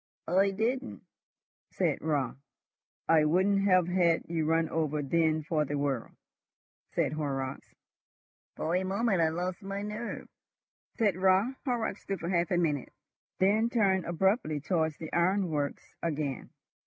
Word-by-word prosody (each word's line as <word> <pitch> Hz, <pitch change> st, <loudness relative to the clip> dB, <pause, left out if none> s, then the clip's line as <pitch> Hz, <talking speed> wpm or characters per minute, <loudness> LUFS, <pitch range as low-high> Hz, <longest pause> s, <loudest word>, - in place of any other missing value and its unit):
"I 190 Hz, +4 st, +3 dB
didn't," 235 Hz, +7 st, -2 dB, 0.7 s
said 170 Hz, -6 st, 0 dB
Raut. 145 Hz, -5 st, 0 dB, 0.7 s
"I 160 Hz, -2 st, +5 dB
wouldn't 190 Hz, +6 st, +3 dB
have 185 Hz, -3 st, +4 dB
had 175 Hz, -2 st, +2 dB
you 165 Hz, -2 st, -1 dB
run 165 Hz, 0 st, +2 dB
over 150 Hz, -2 st, -1 dB
then 155 Hz, +2 st, +1 dB
for 155 Hz, -2 st, 0 dB
the 145 Hz, 0 st, -3 dB
world," 140 Hz, -4 st, -1 dB, 0.8 s
said 155 Hz, -4 st, 0 dB
Horrocks. 135 Hz, -3 st, -4 dB, 0.8 s
"For 165 Hz, +2 st, -1 dB
a 185 Hz, -, +1 dB
moment 195 Hz, 0 st, +1 dB
I 160 Hz, -, +4 dB
lost 180 Hz, +4 st, -3 dB
my 195 Hz, 0 st, -4 dB
nerve," 210 Hz, +3 st, -5 dB, 0.7 s
said 205 Hz, -6 st, +2 dB
Raut. 190 Hz, +6 st, +3 dB
Horrocks 235 Hz, -6 st, -1 dB
stood 195 Hz, -2 st, -4 dB
for 170 Hz, -, -4 dB
half 175 Hz, -2 st, +1 dB
a 180 Hz, -, +1 dB
minute, 150 Hz, -6 st, 0 dB, 0.5 s
then 215 Hz, +5 st, +3 dB
turned 195 Hz, -6 st, +2 dB
abruptly 175 Hz, -, +1 dB
towards 160 Hz, -1 st, 0 dB
the 160 Hz, -, -8 dB
ironworks 170 Hz, -5 st, 0 dB
again. 150 Hz, -5 st, -3 dB
170 Hz, 140 wpm, -30 LUFS, 155-195 Hz, 0.8 s, I